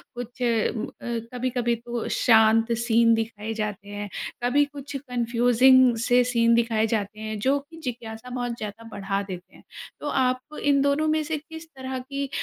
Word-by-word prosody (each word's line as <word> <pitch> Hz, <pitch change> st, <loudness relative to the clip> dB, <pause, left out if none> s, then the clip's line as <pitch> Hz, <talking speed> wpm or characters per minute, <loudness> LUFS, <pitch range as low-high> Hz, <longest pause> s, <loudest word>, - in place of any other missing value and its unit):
कुछ 245 Hz, +1 st, -8 dB
उम, 230 Hz, -2 st, +1 dB
अ, 235 Hz, -1 st, -5 dB
कभी-कभी 245 Hz, -1 st, 0 dB
तो 235 Hz, 0 st, -5 dB
शांत 225 Hz, 0 st, +5 dB
सीन 230 Hz, 0 st, +4 dB
दिखाए 225 Hz, -1 st, -3 dB
जाते 210 Hz, -2 st, -4 dB
हैं, 205 Hz, 0 st, -5 dB, 0.3 s
कभी 275 Hz, +4 st, +4 dB
कुछ 285 Hz, 0 st, -9 dB
कन्फ्यूज़िंग 245 Hz, +1 st, +4 dB
से 245 Hz, 0 st, +4 dB
सीन 235 Hz, -1 st, +3 dB
दिखाए 225 Hz, -1 st, +2 dB
जाते 210 Hz, -1 st, -2 dB
हैं, 215 Hz, 0 st, -4 dB
जो 275 Hz, +5 st, +1 dB, 0.2 s
जिज्ञासा 230 Hz, -1 st, -6 dB
बहुत 245 Hz, -1 st, -3 dB
ज़्यादा 215 Hz, +1 st, -7 dB
बढ़ा 195 Hz, 0 st, -2 dB
देते 185 Hz, -2 st, -9 dB
हैं। -, -, -17 dB, 0.4 s
तो -, -, -5 dB
आप 255 Hz, +3 st, -1 dB
इन 280 Hz, -1 st, +3 dB
दोनों 285 Hz, +2 st, +2 dB
में 310 Hz, 0 st, +2 dB
से 305 Hz, 0 st, -2 dB
किस 320 Hz, +2 st, -10 dB
तरह 260 Hz, 0 st, -5 dB
की 275 Hz, +2 st, -4 dB
240 Hz, 165 wpm, -25 LUFS, 220-260 Hz, 0.4 s, शांत